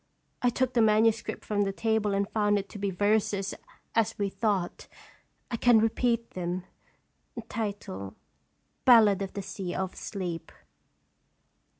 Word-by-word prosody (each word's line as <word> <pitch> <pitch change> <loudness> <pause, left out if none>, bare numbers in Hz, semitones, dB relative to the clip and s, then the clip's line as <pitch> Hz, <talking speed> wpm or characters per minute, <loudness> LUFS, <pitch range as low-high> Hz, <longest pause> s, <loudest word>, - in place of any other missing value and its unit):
I 245 - +4
took 255 +1 0
the 240 - +3
manuscript 220 +1 +2
from 205 -1 0
the 195 -1 +1
table, 215 0 0
and 200 0 0
found 205 -1 +2
it 195 - -3
to 205 - -9
be 200 0 0
verses, 205 +1 +1 0.4
as 225 -1 +1
we 200 -1 0
thought. 195 -3 -1 0.6
I 235 - -1
can 240 0 +5
repeat 230 +1 +1
them: 180 0 -3 0.7
BALLADE 210 - 0
OF 195 -1 -4
THE 200 - -4
SEA 190 -1 -5
OF 190 -1 -3
SLEEP. 180 -5 -5
205 Hz, 130 wpm, -28 LUFS, 195-225 Hz, 0.7 s, can